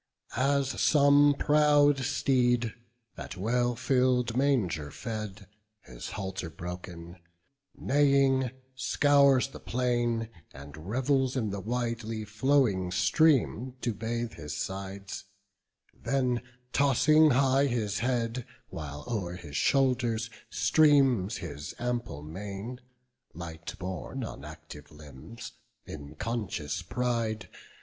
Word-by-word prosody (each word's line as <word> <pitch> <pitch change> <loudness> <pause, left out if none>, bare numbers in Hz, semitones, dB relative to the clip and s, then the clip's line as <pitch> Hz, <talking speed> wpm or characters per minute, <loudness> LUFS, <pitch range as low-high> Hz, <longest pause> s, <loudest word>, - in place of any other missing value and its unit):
As 135 +1 +1
some 145 -1 +5
proud 145 -1 +4
steed, 125 -3 +1 0.5
at - - -7
well 120 +5 +1
fill'd 125 -2 +1
manger 110 - +1
fed, 105 - -6 0.4
His 60 -7 -9
halter 95 -4 -5
broken, 85 +1 -8 0.6
neighing, 135 -2 +3 0.2
scours 140 0 +4
the - - -10
plain, 120 -2 0 0.3
And 70 +4 -11
revels 130 +2 +1
in 110 -5 -1
the 100 - -4
widely 115 0 -3
flowing 110 -4 +2
stream 125 - +2
To 120 - -1
bathe 115 +3 -3
his 75 -2 -6
sides; 95 +1 -5 0.7
then 125 -3 0 0.3
tossing 150 +3 +5
high 135 +1 +3
his 110 -5 -1
head, 120 0 -1 0.2
While 75 -2 -7
o'er 95 -7 -3
his 80 -5 -9
shoulders 120 - +1 0.2
streams 135 - +3
his 75 -3 -7
ample 120 -11 -3
mane. 100 +9 -6 0.6
Light 85 +4 -7
borne 90 -2 -5
on - - -7
active 75 +1 -11
limbs, 75 - -11 0.3
in 75 0 -9
conscious 95 -6 -3
pride. 115 -1 -2
115 Hz, 105 wpm, -29 LUFS, 95-130 Hz, 0.7 s, some